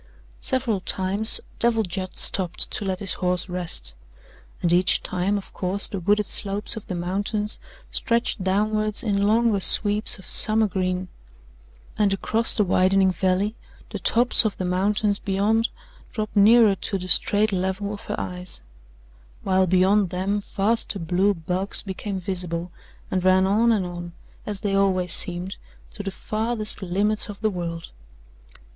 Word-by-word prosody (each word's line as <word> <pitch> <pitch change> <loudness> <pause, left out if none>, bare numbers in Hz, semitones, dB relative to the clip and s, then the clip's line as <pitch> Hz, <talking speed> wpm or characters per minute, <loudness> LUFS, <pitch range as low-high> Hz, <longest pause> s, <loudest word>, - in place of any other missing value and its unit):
Several 245 -6 0
times 195 +4 +2 0.2
Devil 230 -1 +1
Judd 185 0 -6
stopped 180 -3 -2
to - - -2
let 190 -1 -3
his 195 - -1
horse 180 0 0
rest, 175 - -3 0.7
and 170 -1 +4
each 180 +1 +3
time, 185 +3 -1
of 200 - -9
course, 190 +2 -1
the 200 - -5
wooded 205 +4 +1
slopes 200 +2 +1
of 220 - -9
the 185 - -4
mountains 200 +4 -2 0.3
stretched 235 -4 -1
downward 215 +2 +1
in 200 -2 0
longer 225 -1 +2
sweeps 210 +3 +5
of 190 - -15
summer 220 0 +4
green, 185 -2 -2 0.9
and 205 -2 +2
across 225 +4 +2
the 210 - +4
widening 190 0 +2
valley 190 +4 -1 0.4
the - - -5
tops 240 +2 +4
of 215 -2 -2
the 185 - -3
mountains 200 +3 0
beyond 210 +4 0 0.4
dropped 215 -1 -5
nearer 215 +1 +5
to 195 +1 -3
the 185 -1 -7
straight 210 +3 +4
level 190 +2 -3
of 205 - -10
her - - -4
eyes, 180 - -6 0.8
while 190 0 +1
beyond 185 +2 +2
them 190 +3 -2
vaster 210 +2 -1
blue 185 +4 0
bulks 180 +4 -2
became 195 0 -5
visible 175 -2 -2 0.4
and 185 -1 -1
ran 185 0 +4
on 220 +4 +2
and 205 -5 0
on, 175 -1 -8 0.3
as 205 -2 -5
they 200 -2 -2
always 185 -3 +1
seemed, 180 +2 0 0.3
to 215 - -8
the 200 - -4
farthest 215 +2 -4
limits 205 +4 +1
of 205 - -9
the 215 -1 0
world. 170 -2 -6
195 Hz, 150 wpm, -23 LUFS, 185-210 Hz, 0.9 s, sweeps